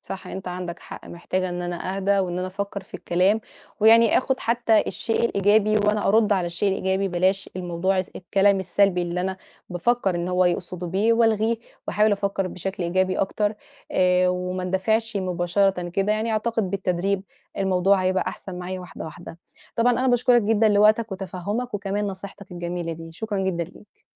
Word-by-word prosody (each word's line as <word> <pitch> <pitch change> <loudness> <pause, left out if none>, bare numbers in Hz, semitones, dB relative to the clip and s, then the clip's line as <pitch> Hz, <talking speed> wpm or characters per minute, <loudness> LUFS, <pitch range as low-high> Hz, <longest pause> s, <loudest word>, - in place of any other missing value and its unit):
صح، 190 - -8
أنت 190 -1 -6
عندك 180 -1 -5
حق، - - -10
محتاجة 185 +2 -3
إن 175 0 -4
أنا 175 +2 -4
أهدى 200 +1 +2
وإن 180 -2 -1
أنا 185 - -2
أفكّر 200 +1 -5
في - - -20
الكلام، 185 +5 +1 0.4
ويعني 225 +1 +6
آخد 260 0 -1
حتى 230 -2 +3
الشيء 225 +1 -1
الإيجابي 210 0 +3
وأنا 210 0 +1
أرُدّ 215 0 +4
على 185 -3 +1
الشيء 170 +4 0
الإيجابي، 190 0 0
بلاش 185 +2 0
الموضوع 185 +1 -1
الس 185 - -1
الكلام 195 +2 +2
السلبي 190 0 +2
اللي 175 +1 -2
أنا 190 +1 -2 0.3
بافكّر 195 +2 +1
إنه 175 +1 -2
هو 180 0 +3
يقصدُه 180 0 -2
بيه، 200 +6 +2
وألغيه 225 0 +2 0.3
وأحاول 210 0 +3
أفكّر 200 -1 -1
بشكل 190 +1 -4
إيجابي 185 +2 +1
أكتر 205 +2 0 0.4
آآ، 180 0 +3
وما 180 0 -2
أندفعش 220 +4 0
مباشرةً 180 0 0
كده، 195 +4 0
يعني 220 +1 -1
أعتقد 220 -3 -1
بالتدريب 190 0 -1 0.4
الموضوع 190 0 +2
هيبقى 185 0 +1
أحسن 180 -2 -7
معايا 185 +1 -5
واحدة، 180 -2 -9
واحدة، 165 +1 -10 0.4
طبعًا 240 +2 +4
أنا 255 +2 0
باشكرك 245 -1 +4
جدًا 220 +1 +3
لوقتك 215 +1 +4
وتفهّمك، 200 +5 -4
وكمان 205 +1 -2
نصيحتك 195 0 -8
الجميلة 175 -1 -4
دي، 165 0 -9
شكرًا 210 +3 -4
جدًا 190 -3 -1
ليك. 190 +4 -18
190 Hz, 170 wpm, -24 LUFS, 180-210 Hz, 0.4 s, ويعني